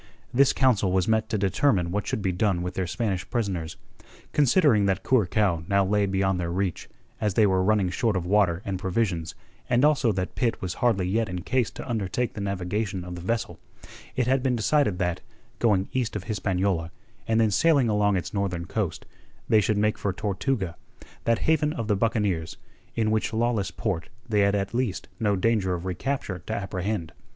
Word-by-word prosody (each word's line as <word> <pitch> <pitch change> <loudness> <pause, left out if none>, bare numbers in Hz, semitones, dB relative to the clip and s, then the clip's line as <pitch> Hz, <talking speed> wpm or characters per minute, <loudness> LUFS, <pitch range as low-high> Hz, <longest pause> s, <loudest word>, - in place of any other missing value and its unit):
This 135 +2 +5
council 110 -8 +2
was 95 +2 +1
met 110 0 +1
to 110 - 0
determine 95 -2 +1
what 100 +2 -2
should 105 - -2
be 95 - +1
done 90 -1 0
with 90 +1 -4
the 95 -1 -2
Spanish 95 0 -2
prisoners. 95 -9 -2 0.6
Considering 140 - +4
that 95 - 0
Curacao 100 -7 +2
now 100 0 +3
lay 100 +1 +2
beyond 95 -1 +1
their 85 -1 -2
reach, 95 -1 -2 0.3
as 105 -3 0
they 110 - +5
were 95 -2 +2
running 100 -2 +2
short 110 +2 0
of 90 -2 -1
water 95 -2 +2
and 95 -2 -3
provisions, 90 -4 -1 0.3
and 125 +3 +4
also 135 -6 +3
that 90 -1 -3
Pitt 120 -3 0
was 90 -2 -3
hardly 105 -7 +2
yet 110 +3 0
in 90 -1 -4
case 125 -3 +1
to - - -9
undertake 115 0 -1
the 105 - -6
navigation 100 0 -2
of 90 0 -7
the 90 - -7
vessel, 115 +6 -2 0.6
it 125 -2 +1
had 130 +1 +2
been 130 -1 +1
decided 120 -3 +2
that, 90 -1 -1 0.4
going 100 -5 +2
east 125 -5 -1
of 105 - -3
Hispaniola, 95 -5 -1 0.4
and 115 0 +2
then 110 -2 +3
sailing 145 +2 +4
along 105 -2 +2
its 90 - -3
northern 95 -4 -2
coast, - - -3 0.4
they 110 -1 +5
should 105 +1 +1
make 105 +1 +1
for 100 - 0
Tortuga, 100 -1 -2 0.5
that 115 -1 +3
haven 155 -1 +2
of 115 -9 -4
the 105 - +2
buccaneers, 100 -6 0 0.4
in 110 -2 +1
which 110 +1 0
lawless 115 -3 0
port 90 -8 -3 0.2
they 105 -3 +1
had 100 0 +3
at 100 +1 -2
least 115 -6 -2
no 105 -2 +2
danger 95 -2 +1
of 85 +1 -6
recapture 95 0 -3
to - - -2
apprehend. 95 -3 -3
100 Hz, 190 wpm, -26 LUFS, 95-115 Hz, 0.6 s, This